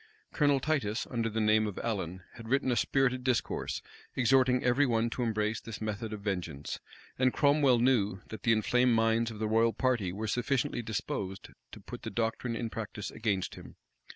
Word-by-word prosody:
Colonel 145 -3 +3
Titus, 130 -8 -1
under 115 -2 0
the 110 +1 -2
name 110 0 +3
of 105 - -6
Allen, 95 -5 -3
had 115 -1 -10
written 135 0 +2
a - - +2
spirited 130 0 +1
discourse, 125 -2 -1 0.3
exhorting 130 0 +3
every 130 +3 +3
one 115 -1 +1
to 125 - -3
embrace 110 -2 0
this 115 - -7
method 110 +1 -4
of 105 -1 -6
vengeance; 85 -8 -4 0.4
and 130 0 +4
Cromwell 140 -3 +4
knew, 110 -6 +2
that 110 - -7
the 115 - +2
inflamed 125 +3 +3
minds 115 +1 +2
of 110 - -8
the 110 0 -1
royal 115 +1 +3
party 120 -8 0
were 105 +4 -4
sufficiently 125 +3 0
disposed 100 -3 -4 0.2
to - - -10
put - - -9
the - - -5
doctrine 115 +1 -2
in 115 -1 -3
practice 105 -3 -5
against 105 -4 -1
him. - - -12
115 Hz, 180 wpm, -30 LUFS, 105-125 Hz, 0.4 s, and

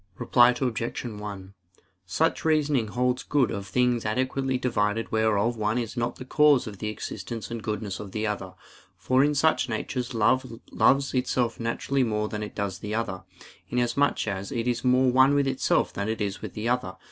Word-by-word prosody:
Reply 120 0 +5
Obj. 120 -2 -2
1: 105 -4 -7 0.5
Such 160 - 0
reasoning 150 -7 +2
holds 125 +3 0
good 140 -5 +1
of 100 -1 -5
things 120 +4 +1
adequately 130 +4 -1
divided 115 -3 -1
whereof 110 +1 +1
one 110 +2 0
is 120 -2 -3
not 120 -1 -1
the 130 - -9
cause 150 -1 +4
of 105 -4 -8
the 105 - -3
existence 110 +1 -6
and 115 -1 -4
goodness 105 -3 -4
of 100 -2 -8
the 110 +1 -2
other; 100 -4 -4 0.4
for 130 +1 +2
in 150 0 +2
such 150 -2 +2
natures 120 +2 -3
each 115 +1 +1
loves 135 +1 +3
itself 125 -2 0
naturally 120 +4 -1
more 105 -3 0
than 105 - -4
it 105 - -6
does 100 -3 -3
the 105 +1 -4
other, 105 -5 -2 0.5
inasmuch 125 +2 +1
as 100 +1 -3
it 120 -2 -2
is 120 -1 -1
more 130 0 +4
one 130 +3 +5
with 140 -1 +3
itself 130 -1 +1
than 100 +2 -3
it 110 - -2
is 100 -2 -3
with - - -7
the 110 +2 -3
other. 105 -7 -1
115 Hz, 185 wpm, -26 LUFS, 105-130 Hz, 0.5 s, Reply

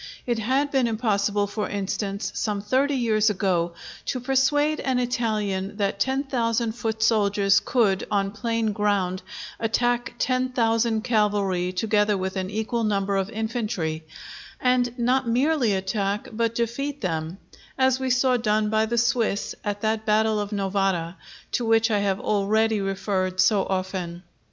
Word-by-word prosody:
It 240 -2 0
had 265 +6 +1
been 265 -3 +2
impossible, 205 -3 +1
for 205 +1 -3
instance, 200 0 -3
some 210 -2 -1
thirty 265 +7 +1
years 220 -4 +2
ago, 180 -4 0 0.3
to 255 - -2
persuade 290 +4 +2
an 260 -2 0
Italian 215 -5 -1
that 200 -1 -1
ten 265 +6 +1
thousand 235 -4 0
foot 220 -1 -3
soldiers 200 -3 +3
could, 210 -7 +1
on 195 -1 0
plain 225 +1 -1
ground, 200 -3 0 0.4
attack 240 +2 0
ten 255 0 0
thousand 230 -2 +1
cavalry 205 -6 +1
together 205 +2 +1
with 190 0 -3
an 190 -1 -2
equal 220 +3 -2
number 200 -2 0
of 195 0 0
infantry; 215 -8 -3 0.6
and 250 -1 +1
not 250 +1 +1
merely 250 -2 +2
attack, 195 +1 -2
but 230 +1 -1
defeat 270 +5 -2
them; 165 -2 -3 0.4
as 260 -1 +3
we 265 0 -1
saw 255 0 +3
done 215 -2 +1
by 220 0 +2
the 235 +1 -1
Swiss 230 -3 +1
at 205 0 -3
that 220 0 0
battle 215 0 +3
of 205 0 -3
Novara, 195 -4 -1 0.4
to 245 - 0
which 225 0 +3
I 210 - +2
have 195 -1 0
already 215 +1 +1
referred 190 -1 -2
so 190 +1 +4
often. 185 -2 -3
215 Hz, 150 wpm, -24 LUFS, 200-240 Hz, 0.6 s, so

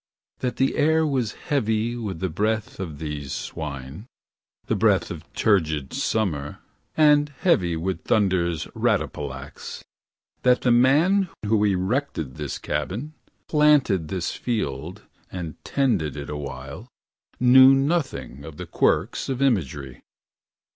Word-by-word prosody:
That 125 -1 -2
the 135 - +1
air 160 +1 +3
was 130 -7 -1
heavy 115 -4 -1
with 105 -8 -5
the 95 - +1
breath 105 +6 -2
of 80 -6 -5
these 75 -2 -5
swine. 70 - -6 0.6
The - - 0
breath - - +2
of - - -9
turgid 80 -10 +1
summer, 80 -10 -1 0.4
and 150 -1 +5
Heavy 90 - +2
with 95 +3 -3
thunder's 85 -6 +1
rattapallax. 70 -1 -3 0.6
That 125 0 +4
the 125 - +2
man 155 +11 +4 0.2
who 105 0 +2
erected 95 - -1
this 75 -2 -4
cabin, 105 - -3 0.3
planted 145 - +3
This 90 +1 -2
field, 95 - -3 0.3
and 85 -5 -7
tended 100 - 0
it 70 0 -6
awhile. 70 - -7 0.5
Knew 130 +2 +8
not 145 +4 +2
the 75 - -9
quirks 90 - +1
of 130 -2 -2
imagery. 75 - -1
100 Hz, 120 wpm, -24 LUFS, -, 0.6 s, Knew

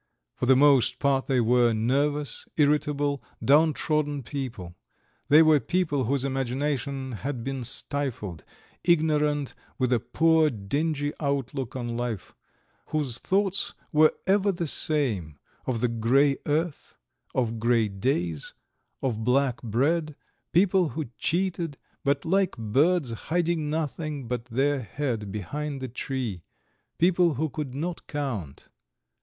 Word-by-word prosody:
For 125 - -3
the 130 - +7
most 140 -2 +4
part 135 -2 +1
they 130 -2 +2
were 120 0 +4
nervous, 140 +6 0
irritable, 145 -2 +1 0.2
downtrodden 150 0 +2
people; 115 -9 -6 0.5
they 155 +3 +8
were 155 -2 +5
people 145 -1 0
whose 135 +2 0
imagination 135 0 -2
had 125 +2 -4
been 135 0 -3
stifled, 125 - -3 0.4
ignorant, 150 -4 +2 0.2
with 130 -2 +1
a 120 - +3
poor, 160 +5 +3
dingy 145 +7 -2
outlook 140 -3 -2
on 120 -2 -3
life, 120 -5 -4 0.5
whose 140 -6 -2
thoughts 195 0 0 0.2
were 155 0 +5
ever 200 +1 +3
the 175 -2 -3
same 120 - +2 0.3
of 120 -4 -1
the 125 - +3
grey 125 +5 +2
earth, 155 +1 -2 0.4
of 115 -3 0
grey 115 -1 +3
days, 95 - -2 0.5
of 115 -4 -1
black 125 +1 +2
bread, 145 +7 0 0.4
people 180 -1 +3
who 145 -6 -5
cheated, 170 -4 -1 0.3
but 140 -1 0
like 190 +2 +1
birds 135 +6 +2 0.2
hiding 170 -2 0
nothing 150 -3 -3
but 120 -1 -3
their 135 +4 +1
head 115 -5 -3
behind 140 - -4
the 130 - -4
tree 125 -6 -4 0.6
people 175 -1 +3
who 155 +5 0
could 140 -3 -5
not 170 +4 -4
count. 120 - -4
140 Hz, 125 wpm, -26 LUFS, 120-155 Hz, 0.6 s, they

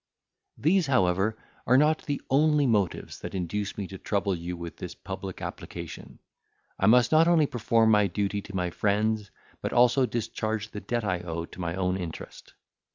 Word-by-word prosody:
These, 170 +2 +2
however, 105 -3 +2 0.3
are 125 - +6
not 155 +3 +2
the 145 -1 -1
only 150 +1 +4
motives 105 -7 0
that - - -7
induce 95 +3 -3
me 100 - -3
to 95 - -8
trouble 100 -1 0
you 90 0 -5
with 85 -1 -7
this - - -7
public - - -7
application. - - -7 0.6
I 95 - +3
must 120 +2 +5
not 160 +1 +5
only 165 -3 +5
perform 115 -3 +2
my 105 -1 +4
duty 100 +2 -1
to 100 0 -10
my 90 -1 -1
friends, 105 +2 0 0.3
but - - -3
also 125 +2 +4
discharge 110 -2 -3
the 105 - -6
debt 120 -1 -2
I 90 -3 0
owe 85 -1 -4
to 90 - -10
my 85 0 -2
own 95 0 0
interest. 85 -4 -8
105 Hz, 175 wpm, -27 LUFS, 95-125 Hz, 0.6 s, are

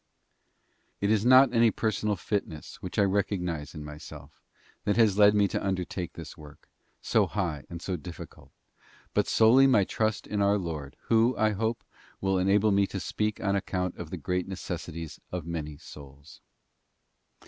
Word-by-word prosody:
It 100 +1 +1
is 110 -2 +2
not 130 +1 +6
any 115 -1 +5
personal 105 -1 -1
fitness 85 -5 -4
which 90 - -7
I 105 - +5
recognise 90 -6 -1
in 75 -1 -7
myself 75 -1 -11 0.4
that 105 +1 0
has 105 -3 +4
led 105 0 +7
me 100 -1 +4
to - - -2
undertake 90 -2 -3
this 80 -2 -9
work, 75 -3 -15 0.4
so - - +2
high 85 -8 -3
and 85 0 -8
so 95 -2 -2
difficult, 85 +3 -11 0.6
but - - +1
solely 125 +5 +6
my 125 -7 +4
trust 110 +2 -1
in 105 -1 -2
our 100 +1 +3
Lord, 80 -7 -5
Who, 115 +2 +3
I 110 +1 +3
hope, 110 +3 -2 0.4
will 95 -1 +1
enable 100 +3 +3
me 100 0 +3
to 95 - -5
speak 105 +2 -2
on 100 -1 +1
account 90 -2 -2
of 85 - -7
the 90 - -5
great 90 +3 -2
necessities 85 -4 -6
of 90 -3 -4
many 75 -3 -5
souls. 70 -2 -14
95 Hz, 165 wpm, -28 LUFS, 80-105 Hz, 0.6 s, led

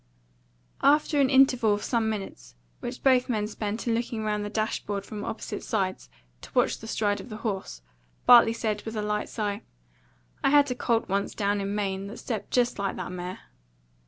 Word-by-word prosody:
After 295 0 +4
an 265 - +3
interval 255 -5 +5
of 205 - -6
some 230 -3 +1
minutes, 195 - -6 0.2
which - - -6
both 255 -2 +4
men 215 -3 0
spent 210 +2 -4
in 230 - +2
looking 230 -1 -2
round 210 -1 -1
the 205 - -4
dash 215 +1 -1
board 200 -1 -3
from 210 0 -6
opposite - - -5
sides 190 - -2 0.3
to - - -11
watch - - +2
the 225 - -9
stride 205 -2 0
of 250 - -12
the 215 - -6
horse, 190 - -3 0.4
Bartley 240 -2 +8
said, 215 -2 -2
with 220 0 -6
a 210 - -2
light 210 0 -1
sigh, 205 -2 -3 0.8
"I - - +4
had 285 -1 +5
a - - +2
colt 235 -2 0
once 200 +1 -1
down 205 0 0
in 200 +1 -2
Maine 195 -1 -2
that 215 - -8
stepped 220 -5 -4
just 245 -3 +1
like 195 -1 -1
that 180 -1 -5
mare." 180 +1 -6
215 Hz, 195 wpm, -27 LUFS, 200-235 Hz, 0.8 s, Bartley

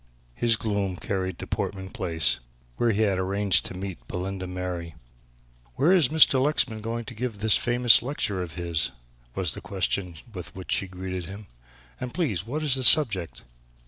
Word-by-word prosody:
His 115 - +2
gloom 100 -4 -2
carried 95 -1 -3
to - - -6
Portman 95 -1 -4
Place, 80 -8 0 0.4
where 120 - +1
he 110 0 +1
had 100 -3 +1
arranged 100 +1 0
to - - -8
meet 90 -11 -7
Belinda 95 +1 -5
Mary. 90 -2 -5 0.8
"Where 140 +7 +3
is 180 -8 +5
Mr. 140 -3 +5
Lexman 130 -7 +1
going 115 +1 -4
to 120 - -8
give 115 -1 -4
this 110 0 +4
famous 120 0 +5
lecture 120 -7 -2
of 85 -3 -7
his?" 85 -4 -1 0.5
was - - 0
the - - -8
question 95 -2 -2 0.2
with 90 -4 -8
which 95 -3 -7
she 100 - 0
greeted 90 -1 -6
him, 100 +4 -9 0.5
"and, 125 +1 -6
please, 110 - -1
what 150 +6 -3
is 145 -4 +2
the 130 0 -1
subject?" 110 - +6
100 Hz, 175 wpm, -25 LUFS, 90-120 Hz, 0.8 s, subject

